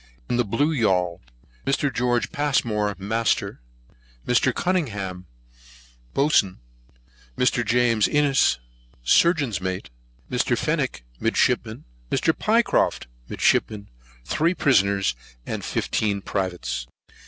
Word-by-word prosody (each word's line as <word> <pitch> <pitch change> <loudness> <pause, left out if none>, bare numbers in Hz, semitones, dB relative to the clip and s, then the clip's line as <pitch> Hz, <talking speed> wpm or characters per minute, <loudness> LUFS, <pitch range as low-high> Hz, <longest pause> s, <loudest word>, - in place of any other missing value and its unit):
In 120 - 0
the 120 - +3
Blue 130 +9 0
Yaul: 90 -8 +1 0.4
Mr. 140 0 0
Geo. 120 +1 +1
Passmore, 110 -8 0
Master, 110 - -1 0.6
Mr. 125 - +3
Cunningham, 100 - -2 0.9
Boatswain, 135 -10 +2 0.8
Mr. - - +2
James 115 -2 +2
Innes, 145 -2 +3 0.5
Surgeon's 140 - +3
Mate, 95 -7 -4 0.4
Mr. - - 0
Fenwick, - - -1 0.2
Midshipman, - - 0 0.2
Mr. 160 - +1
Pycroft, 225 +1 +1 0.2
Midshipman, 105 -2 +1 0.4
Three 165 +4 +1
Prisoners, 100 - +2 0.3
Fifteen 100 -2 -2
Privates. 90 -10 -3
115 Hz, 90 wpm, -24 LUFS, 95-140 Hz, 0.9 s, the